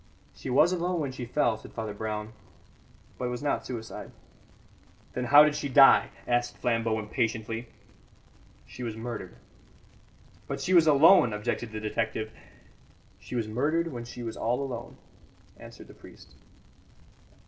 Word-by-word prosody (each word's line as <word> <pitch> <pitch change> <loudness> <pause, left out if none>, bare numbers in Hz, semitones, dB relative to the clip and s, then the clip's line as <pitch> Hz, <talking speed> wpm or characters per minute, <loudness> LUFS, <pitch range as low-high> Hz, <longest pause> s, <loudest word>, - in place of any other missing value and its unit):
"She - - -8
was 140 +7 +4
alone 180 0 -1
when 140 -4 -2
she 130 -1 -6
fell," 120 -2 +1
said - - -13
Father 110 -2 -4
Brown, 105 +1 -5 0.9
"but 125 - -2
it - - -1
was 125 +3 -5
not 145 - -1
suicide." 115 -3 -7 1.0
"Then 125 - -2
how 145 +4 +8
did 150 -1 +2
she 140 - -3
die?" 135 +1 +7 0.2
asked 120 0 0
Flambeau 115 -2 0
impatiently. 115 +2 -3 1.0
"She - - -11
was 115 -3 -4
murdered." 115 - -6 1.1
"But - - -4
she 185 - -1
was 170 -3 +6
alone," 150 - +6
objected 105 +2 -3
the 110 - -5
detective. 110 0 -3 0.9
"She - - -8
was 115 -3 -1
murdered 155 +9 0
when 120 -2 -6
she 120 0 -8
was 115 -1 -5
all 120 +4 -1
alone," 120 -3 -7 0.6
answered - - -13
the - - -14
priest. - - -16
120 Hz, 150 wpm, -28 LUFS, 110-140 Hz, 1.1 s, how